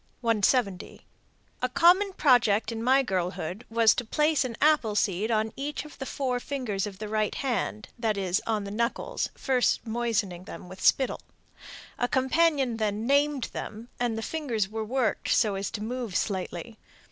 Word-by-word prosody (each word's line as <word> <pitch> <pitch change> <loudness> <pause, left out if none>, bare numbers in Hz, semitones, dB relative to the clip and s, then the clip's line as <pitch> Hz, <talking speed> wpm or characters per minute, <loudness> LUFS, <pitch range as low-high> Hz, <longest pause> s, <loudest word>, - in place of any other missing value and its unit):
_ - - -41 0.2
170. 225 -3 +1 0.6
"A 250 - +1
common 365 +8 +5
project 240 - +3
in 225 -1 -4
my 265 +3 +4
girlhood 185 +1 -3
was 225 -1 +5
to 245 - -2
place 300 +5 +2
an 240 -3 -5
apple 295 -9 +3
seed 205 +1 +1
on 220 -1 0
each 290 +2 -4
of 300 - -13
the 270 - -4
four 255 -3 -1
fingers 240 -8 -3
of 195 -2 -8
the 215 +1 -5
right 215 0 0
hand, 195 - -2
that 220 -3 0
is, 190 -1 0
on 215 -2 0
the 200 - -6
knuckles, 235 - -2
first 255 -3 +1
moistening 220 -6 -1
them 180 - -9
with 185 +1 -11
spittle. 265 -2 +3 0.8
A 245 - +2
companion 265 -2 +2
then 215 0 -1
'named' 280 -1 +2
them, 220 +3 -7
and 240 -2 0
the 225 - -3
fingers 245 -11 -1
were 220 +2 -4
worked 245 +1 -1
so 210 -2 +3
as 195 0 -3
to 210 - -5
move 235 -4 -4
slightly. 190 +2 -3
230 Hz, 170 wpm, -27 LUFS, 205-260 Hz, 0.8 s, common